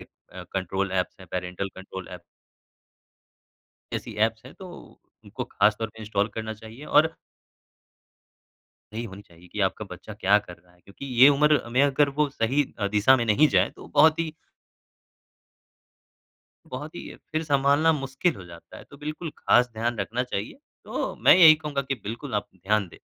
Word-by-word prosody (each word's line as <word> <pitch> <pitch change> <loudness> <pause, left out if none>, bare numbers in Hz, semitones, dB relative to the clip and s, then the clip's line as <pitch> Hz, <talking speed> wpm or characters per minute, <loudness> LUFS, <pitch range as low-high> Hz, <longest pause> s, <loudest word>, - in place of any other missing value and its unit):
अ, 95 0 -13
control 95 +1 -2
apps 90 -1 -1
हैं, 95 - -12
parental 90 +1 -3
control 95 -1 -9
app. - - -28 1.7
ऐसी - - -5
apps 115 0 -8
हैं, - - -13
तो 190 -1 -11 0.6
उनको - - -6
खास 105 0 +2
तौर 115 - -3
पे 110 +1 -15
इंस्टॉल 105 -1 -1
करना 110 -1 -4
चाहिए 110 +6 -12
और 160 +2 +3 1.8
यही 115 +1 -3
होनी 100 -1 -9
चाहिए 85 -1 -19
कि - - -6
आपका - - -9
बच्चा - - -9
क्या 100 +2 +3
कर 90 -4 -11
रहा 90 0 -27
है, 90 - -27
क्योंकि 100 +9 -11
ये 135 - +10
उम्र 150 0 +4
में 130 +3 +4
अगर 145 +1 +3
वो 150 - +3
सही 135 +3 +1 0.2
अ, 100 - 0
दिशा 105 +6 +4
में 120 - -1
नहीं 140 +8 +4
जाए, - - +3
तो - - -14
बहुत 155 +2 +5
ही 160 -2 -2 2.4
बहुत 150 +6 -7
ही, - - -8 0.2
फिर 155 +1 0
सँभालना 145 +2 +3
मुश्किल 135 +3 -1
हो 95 - -10
जाता 85 -1 -13
है, - - -13
तो 140 - -16
बिल्कुल 155 +2 -6
खास 125 0 +4
ध्यान 115 0 -2
रखना 115 +5 -2
चाहिए, 105 -5 -5 0.3
तो - - -3
मैं - - +6
यही 160 -4 +9
कहूँगा 150 -3 -3
कि 135 0 -2
बिल्कुल 110 0 -6
आप 105 - -2
ध्यान 100 +1 0
दें। - - -16
115 Hz, 175 wpm, -25 LUFS, 100-145 Hz, 2.4 s, ये